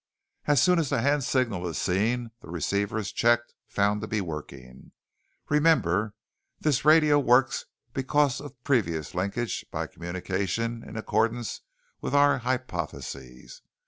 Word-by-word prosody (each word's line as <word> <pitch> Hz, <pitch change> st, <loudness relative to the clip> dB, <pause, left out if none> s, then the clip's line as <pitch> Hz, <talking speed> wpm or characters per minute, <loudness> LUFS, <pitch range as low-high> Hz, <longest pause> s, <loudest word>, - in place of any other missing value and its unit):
As 145 Hz, -2 st, +4 dB
soon 180 Hz, +3 st, +4 dB
as 155 Hz, -5 st, 0 dB
the 140 Hz, -5 st, +1 dB
hand 140 Hz, 0 st, +2 dB
signal 115 Hz, -10 st, 0 dB
is 85 Hz, -, -4 dB
seen 115 Hz, +6 st, 0 dB
the -, -, -13 dB
receiver 100 Hz, +6 st, -1 dB
is 105 Hz, -3 st, -3 dB
checked, 120 Hz, 0 st, +2 dB
found 105 Hz, 0 st, +1 dB
to 105 Hz, -, -4 dB
be 105 Hz, -, -1 dB
working. 70 Hz, -7 st, -8 dB, 0.5 s
Remember, 110 Hz, -, +2 dB, 0.4 s
this 150 Hz, -5 st, +1 dB
radio 155 Hz, -1 st, +6 dB
works 125 Hz, -2 st, +3 dB, 0.3 s
because 135 Hz, 0 st, +1 dB
of 145 Hz, -2 st, -9 dB
the -, -, -43 dB
previous 85 Hz, -, 0 dB
linkage 100 Hz, +6 st, -2 dB
by -, -, -3 dB
communication 95 Hz, +6 st, -3 dB
in 115 Hz, -, -9 dB
accordance 115 Hz, +2 st, -1 dB, 0.4 s
with -, -, -2 dB
our 145 Hz, -1 st, +5 dB
hypothesis. 85 Hz, -, -5 dB
115 Hz, 140 wpm, -27 LUFS, 95-135 Hz, 0.5 s, radio